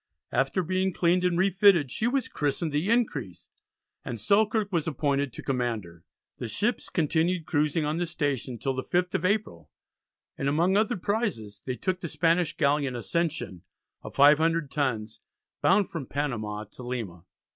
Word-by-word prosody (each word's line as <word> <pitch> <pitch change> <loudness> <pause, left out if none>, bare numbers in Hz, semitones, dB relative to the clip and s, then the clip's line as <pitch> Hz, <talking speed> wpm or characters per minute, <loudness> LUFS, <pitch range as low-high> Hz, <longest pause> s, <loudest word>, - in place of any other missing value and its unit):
After 135 +8 +1
being 185 +2 0
cleaned 180 +1 +2
and 180 -1 +2
refitted 190 - +4
she 220 - 0
was 260 0 0
christened 150 +2 -1
the 150 +7 0
Increase 160 - -1 0.5
and 120 -2 -5
Selkirk 210 - +2
was 165 -4 0
appointed 140 -2 0
to - - -9
command 120 -5 -1
her. 85 -1 -15 0.3
The 120 - -4
ships 210 - -1
continued 165 +1 +1
cruising 150 0 +1
on 150 +2 -1
this 175 -1 -1
station 140 -6 -2
till 135 +3 -2
the 130 0 -3
5th 180 0 0
of 185 -2 0
April, 190 - -1 0.7
and 140 - 0
among 170 +6 +2
other 210 0 +2
prizes 180 - -2
they 130 - -1
took 185 +6 -2
the 175 - -4
Spanish 165 +1 +1
galleon 140 -3 +1
Ascension 150 - -2 0.4
of - - -10
500 150 +2 +4
tons, 115 -7 -2 0.4
bound 195 +1 +3
from 150 -6 -5
Panama 110 -7 -3
to - - -12
Lima. 115 -9 -5
155 Hz, 160 wpm, -27 LUFS, 130-180 Hz, 0.7 s, refitted